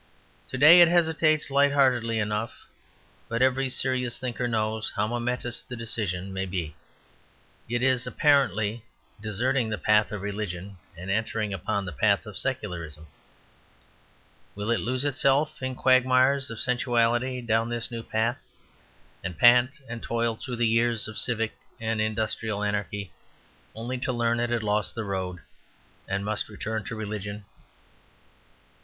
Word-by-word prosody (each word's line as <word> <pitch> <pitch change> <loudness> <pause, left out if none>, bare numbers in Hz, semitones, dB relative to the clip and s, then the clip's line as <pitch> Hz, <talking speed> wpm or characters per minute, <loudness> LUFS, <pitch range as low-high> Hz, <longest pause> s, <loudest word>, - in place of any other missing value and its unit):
To 130 - -5
day 160 +6 +9
it 170 - +9
hesitates, 160 -3 +3
lightheartedly 135 -5 +3
enough, 105 +1 -3 0.6
but 115 +2 +1
every 130 +1 +2
serious 125 -1 0
thinker 125 -1 -3
knows 110 -1 -1
how 105 - +1
momentous 120 +1 -2
the 125 - -8
decision 100 -5 -3
may 95 0 -2
be. 85 -5 -4 0.9
It 120 +1 0
is, 130 -1 +2
apparently, 115 - +2 0.4
deserting 115 +3 0
the 105 - -2
path 105 +4 +3
of 105 -2 -5
religion 100 -2 -5 0.2
and 95 +3 -5
entering 110 0 -1
upon 95 +2 -2
the 90 - -5
path 75 - +2
of - - -9
secularism. 80 -3 -4 1.5
Will 105 +3 -2
it 115 - +2
lose 130 +4 -1
itself 145 +2 +1
in 130 0 -3
quagmires 130 +2 +3
of 115 -1 -6
sensuality 125 0 +1
down 115 -1 0
this 120 0 -3
new 115 -1 -4
path, 115 +2 -1 0.8
and 90 -3 -5
pant 125 - +5
and 115 0 -6
toil 115 -1 -1
through 125 +2 -6
years 115 -1 +2
of 110 - -5
civic 115 -2 0 0.3
and 115 -1 -1
industrial 110 -1 -1
anarchy, 105 -1 -3 0.6
only 120 +3 -4
to 130 - -1
learn 120 -1 0
it 120 0 0
had 120 -2 -1
lost 105 -1 0
the 115 - -3
road, 95 -3 -4 0.7
and 100 +1 -2
must 110 +1 -2
return 110 +1 -4
to 115 - -5
religion? 105 -1 -5
115 Hz, 140 wpm, -26 LUFS, 105-125 Hz, 1.5 s, day